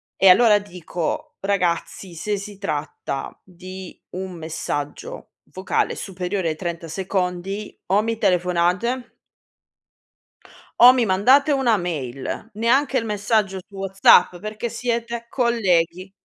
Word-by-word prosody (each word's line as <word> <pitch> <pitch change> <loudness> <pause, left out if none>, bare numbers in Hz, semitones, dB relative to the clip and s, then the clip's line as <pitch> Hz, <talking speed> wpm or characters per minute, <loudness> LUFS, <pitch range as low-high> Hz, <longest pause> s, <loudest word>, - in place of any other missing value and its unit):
e 195 - +5
allora 210 +2 +7
dico: 175 -4 -5
"Ragazzi, 185 -1 -1
se 205 +5 -2
si 200 0 -8
tratta 150 -7 -4
di 185 0 -10
un 185 0 -5
messaggio 155 -3 -5 0.2
vocale 185 +1 -1
superiore 185 -2 -3
ai 155 - -2
30 170 0 -5
secondi 190 +3 -3
o 200 +3 +3
mi 225 0 -2
telefonate" 180 +6 0 1.7
"o 250 - +12
mi 245 -3 +2
mandate 255 +10 +4
una 250 -6 +3
mail, 150 - -4
neanche 255 +6 +2
il 230 - -1
messaggio 210 -2 0
su 200 - -16
WhatsApp 195 -2 +4
perché 215 +3 -5
siete 235 0 -3
colleghi." 190 -7 +1
195 Hz, 115 wpm, -22 LUFS, 175-225 Hz, 1.7 s, o